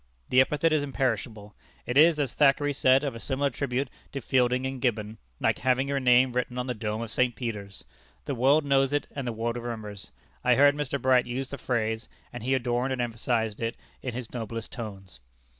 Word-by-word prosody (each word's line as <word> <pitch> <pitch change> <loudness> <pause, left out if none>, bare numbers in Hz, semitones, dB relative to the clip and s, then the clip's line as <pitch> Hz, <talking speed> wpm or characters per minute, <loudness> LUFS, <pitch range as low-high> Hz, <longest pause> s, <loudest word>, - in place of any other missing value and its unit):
The 130 - +6
epithet 150 +4 +2
is 155 - +3
imperishable. 115 -6 -2 0.3
It 125 - -3
is, 155 +2 +6
as 140 -5 0
Thackeray 145 0 +3
said 130 0 +4
of 140 - -2
a 115 - -8
similar 140 +3 -1
tribute 130 +1 -2 0.3
to 140 - -2
Fielding 125 0 +1
in 130 0 -3
Gibbon, 110 -3 -1 0.2
like - - +1
having 130 +1 +1
your 140 0 0
name 125 0 +4
written 125 0 -2
on 125 - -1
the 125 - -2
dome 110 0 -3
of 115 - -6
St. 125 0 +1
Peter's. 105 -5 -6 0.4
The 140 - -2
world 140 +5 +3
knows 135 0 +2
it 145 - +1
and 140 -3 -5
the - - 0
world 115 +1 -2
remembers. 110 -4 -6 0.3
I 125 0 +4
heard 145 +2 +6
Mr. 145 -1 -2
Bright 130 -1 +3
use 130 +2 -4
the 140 - -6
phrase, 110 -2 -2 0.2
and 120 - -6
he 130 +4 +1
adorned 125 +1 0
and 130 - -4
emphasized 115 -2 -1
it 115 0 -2 0.2
in 125 - -4
his 125 -2 -6
noblest 115 -1 -5
tones." 95 - -8
125 Hz, 205 wpm, -27 LUFS, 115-135 Hz, 0.4 s, The